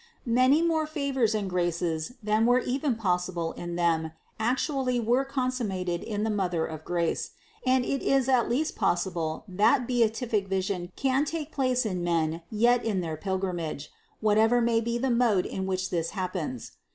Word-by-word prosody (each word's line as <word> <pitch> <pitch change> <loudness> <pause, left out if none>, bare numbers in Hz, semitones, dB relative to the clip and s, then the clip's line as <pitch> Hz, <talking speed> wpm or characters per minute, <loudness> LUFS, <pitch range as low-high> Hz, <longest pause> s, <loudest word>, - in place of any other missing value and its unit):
Many 255 +6 +4
more 320 -2 +1
favors 275 -7 0
and 205 -2 -1
graces 175 0 -1
than 215 +2 +2
were 245 +1 +5
even 260 +1 0
possible 180 -5 -1
in 175 0 -6
them 165 -2 +1 0.3
actually 255 +2 0
were 240 +4 +2
consummat 255 -9 -2
ed 175 -1 -1
in 210 -1 -3
the 220 - 0
Mother 180 -5 0
of 155 -1 -7
grace, 170 -1 -1 0.3
and 255 -1 +3
it 275 - -1
is 270 -2 +2
at 255 -3 +3
least 290 +6 0
possible 175 -3 -1
that 220 +7 +3
beatific 225 -3 +1
vision 190 -1 -2
can 270 +1 +1
take 310 0 -4
place 255 -3 +1
in 185 -4 -2
men 165 -1 0
yet 240 +3 +3
in 205 -5 0
their 160 -2 -3
pilgrim 190 +1 -2
age, 155 -3 -5 0.3
whatever 220 +3 +4
may 230 -1 +2
be 235 +1 -1
the 260 +1 0
mode 235 -6 +3
in 190 0 -3
which 185 0 -2
this 165 -1 -1
happens. 175 - -4
215 Hz, 170 wpm, -27 LUFS, 175-250 Hz, 0.3 s, were